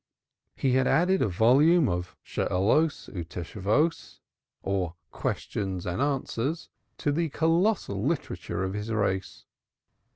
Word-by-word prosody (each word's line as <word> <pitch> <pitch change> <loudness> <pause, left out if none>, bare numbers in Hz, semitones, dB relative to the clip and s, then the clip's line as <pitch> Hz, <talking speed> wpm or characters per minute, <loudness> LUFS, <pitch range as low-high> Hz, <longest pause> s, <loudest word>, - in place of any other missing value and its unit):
He 135 - +1
had 130 +1 +3
added 185 +3 +3
a - - +3
volume 135 - +4
of 90 0 -3
Shaaloth 115 - 0
u 90 - -3
Tshuvoth, 105 - -1 0.5
or 95 -3 -1 0.2
"Questions 95 -3 -3
and 90 +8 -2
Answers" 140 +2 -1 0.3
to 145 - 0
the 165 +2 0
colossal 165 - +1
casuistic 110 +9 0
literature 145 - -3
of 95 0 -2
his 105 +2 -4
race. 100 -4 -1
115 Hz, 125 wpm, -27 LUFS, 95-160 Hz, 0.5 s, volume